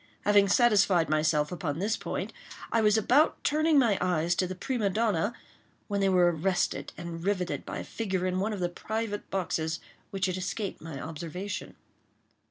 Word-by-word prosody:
Having 205 -1 +5
satisfied 200 -6 +4
myself 155 -1 +2
upon 160 -5 -3
this 210 +5 0
point, - - -4 0.4
I 230 - +3
was 210 0 +4
about 260 +8 +3
turning 310 +1 +3
my 230 -7 +4
eyes 175 -2 +1
to 185 +1 0
the 185 - -5
prima 225 0 -1
donna, 210 -1 +1 0.6
when 200 -1 -1
they 195 - +3
were 180 -2 +4
arrested 175 +2 0
and 170 -1 -6
riveted 185 -2 -1
by - - -4
a - - -4
figure 190 -5 -2
in 185 0 0
one 210 +3 0
of 205 -3 -4
the 175 - +2
private 215 +3 -4
boxes 165 -4 -1 0.3
which 195 -3 -1
had 185 -1 -1
escaped 190 +2 -4
my 160 -4 -7
observation. 170 +6 -6
190 Hz, 175 wpm, -29 LUFS, 175-210 Hz, 0.6 s, Having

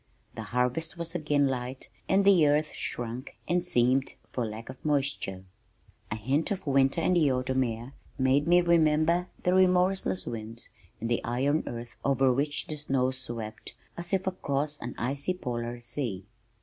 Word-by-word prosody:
The - - -6
harvest 125 +9 -1
was 170 0 -4
again 150 -4 +2
light 130 0 -4 0.2
and 195 +1 +4
the 180 -6 +6
earth 150 +1 +2
shrunk 120 +2 -5
and 175 +2 +2
seamed 130 -4 +2 0.2
for 120 -3 -1
lack 110 +1 -7
of 130 0 -10
moisture. 140 -10 -1 0.7
A - - -2
hint 130 +9 0
of 195 -5 -3
winter 135 +1 +3
in 180 - +2
the 155 -6 +4
autumn 130 +1 +1
air 120 +2 -5 0.2
made 135 +3 +3
me 175 +1 +6
remember 170 +1 +3 0.2
the 180 - +3
remorseless 185 - +3
winds 115 0 -1 0.3
and 115 - -3
the 120 0 0
iron 135 +6 +1
earth 120 0 -7
over 135 -1 +3
which 145 +3 0
the 155 - -5
snows 130 -3 0
swept 115 -4 -6 0.2
as 170 0 -7
if 190 -1 +1
across 150 -5 -1
an 120 - -6
icy 140 +8 -1
polar 120 -6 -4
sea. 120 -5 -4
135 Hz, 160 wpm, -28 LUFS, 120-160 Hz, 0.7 s, the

